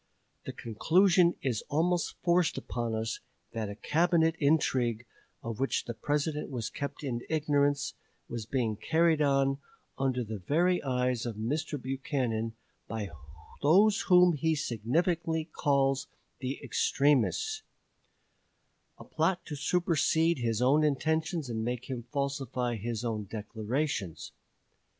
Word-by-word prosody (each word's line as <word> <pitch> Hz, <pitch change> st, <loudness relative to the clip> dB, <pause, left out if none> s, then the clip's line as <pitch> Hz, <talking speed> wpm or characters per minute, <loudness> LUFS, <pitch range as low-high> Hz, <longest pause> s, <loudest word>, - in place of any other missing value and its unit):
The -, -, -4 dB
conclusion 175 Hz, -, +3 dB
is 120 Hz, -5 st, 0 dB
almost 170 Hz, +3 st, +1 dB
forced 175 Hz, -2 st, +2 dB
upon 120 Hz, -2 st, -3 dB
us 110 Hz, 0 st, -2 dB, 0.3 s
that 110 Hz, -2 st, -3 dB
a 100 Hz, -, -6 dB
Cabinet 165 Hz, -, +2 dB
intrigue, 130 Hz, -6 st, +2 dB, 0.4 s
of 115 Hz, -2 st, -5 dB
which 135 Hz, -, 0 dB
the 120 Hz, -, -4 dB
President 150 Hz, +5 st, -1 dB
was 120 Hz, -5 st, -4 dB
kept 140 Hz, +1 st, -5 dB
in 120 Hz, -4 st, -2 dB
ignorance, 145 Hz, -2 st, +1 dB, 0.3 s
was 115 Hz, -2 st, -5 dB
being 115 Hz, -5 st, 0 dB
carried 160 Hz, +6 st, +2 dB
on, 135 Hz, -1 st, +2 dB, 0.4 s
under 130 Hz, -2 st, +1 dB
the 110 Hz, -2 st, -6 dB
very 175 Hz, -, +2 dB
eyes 125 Hz, -2 st, 0 dB
of 115 Hz, -, -4 dB
Mr. 145 Hz, +7 st, -2 dB
Buchanan, 125 Hz, -4 st, -2 dB, 0.3 s
by 110 Hz, -4 st, -4 dB, 0.5 s
those 195 Hz, +8 st, +5 dB
whom 180 Hz, -1 st, +6 dB
he 160 Hz, +2 st, +1 dB
himself 150 Hz, -, -2 dB
significantly 160 Hz, -, 0 dB
calls 135 Hz, -1 st, +2 dB, 0.3 s
"the 130 Hz, +1 st, -3 dB
extremists" 150 Hz, -, +1 dB, 1.4 s
a -, -, -11 dB
plot 170 Hz, +3 st, 0 dB
to 150 Hz, -, -5 dB
supersede 165 Hz, 0 st, +2 dB
his 115 Hz, -1 st, 0 dB
own 145 Hz, +5 st, +4 dB
intentions 155 Hz, +2 st, 0 dB
and 110 Hz, -2 st, -3 dB
make 125 Hz, +2 st, -3 dB
him 120 Hz, -2 st, -5 dB
falsify 135 Hz, -4 st, -2 dB
his 115 Hz, +2 st, -4 dB
own 110 Hz, -3 st, -2 dB
declarations. 110 Hz, -, -3 dB
140 Hz, 125 wpm, -30 LUFS, 120-160 Hz, 1.4 s, whom